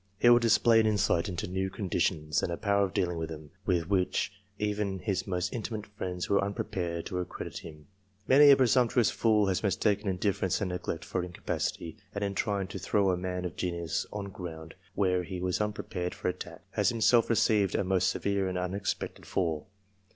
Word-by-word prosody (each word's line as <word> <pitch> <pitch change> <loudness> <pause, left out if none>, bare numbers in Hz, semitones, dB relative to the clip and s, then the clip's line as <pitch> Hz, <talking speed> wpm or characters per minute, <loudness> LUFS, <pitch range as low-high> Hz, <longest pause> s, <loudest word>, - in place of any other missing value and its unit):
He 120 - +3
will 120 - +7
display 115 0 +5
an 110 - +3
insight 100 -3 +2
into 95 +3 -3
new 95 +1 -2
con 100 0 -5
ditions, 75 -3 0
and - - -2
a 85 - -2
power 100 -1 +2
of 95 - -7
dealing 90 -2 0
with 80 0 -3
them, 75 -2 -9 0.2
with 85 -4 +1
which 95 -1 +1 0.3
even 105 -2 -1
his 100 0 -2
most 90 -1 -1
intimate 110 -2 -4
friends 90 -3 -5
were 100 - +2
unprepared 90 -4 -3
to 90 - -3
accredit 90 - -5
him. 75 -2 -11 0.4
Many 145 +2 +8
a 140 - +10
presumptuous 125 -2 +3
fool 110 -2 +3
has 95 -2 0
mistaken 105 +1 +1
indifference 95 -1 0
and 100 -3 -1
neglect 90 -2 -4
for 90 - -2
incapacity; 90 +1 -4 0.2
and 100 - -2
in 100 -1 -1
trying 100 -1 -1
to 95 - -6
throw 95 +1 +2
a - - +1
man 90 0 -3
of 90 - -5
fenius 85 -3 -2
on 100 -1 -5
ground 80 -3 -8 0.2
where 90 -2 +2
he 90 0 -6
was 90 +2 -1
unprepared 100 -4 -3
for - - -2
attack, 90 - -7
has - - +2
imself 115 0 +3
received 105 -4 +3
a - - +1
most 95 -1 +2
severe 100 -1 0
and 90 - -3
unexpected 95 +2 -3
fall. 80 -5 -1
95 Hz, 195 wpm, -29 LUFS, 90-105 Hz, 0.4 s, a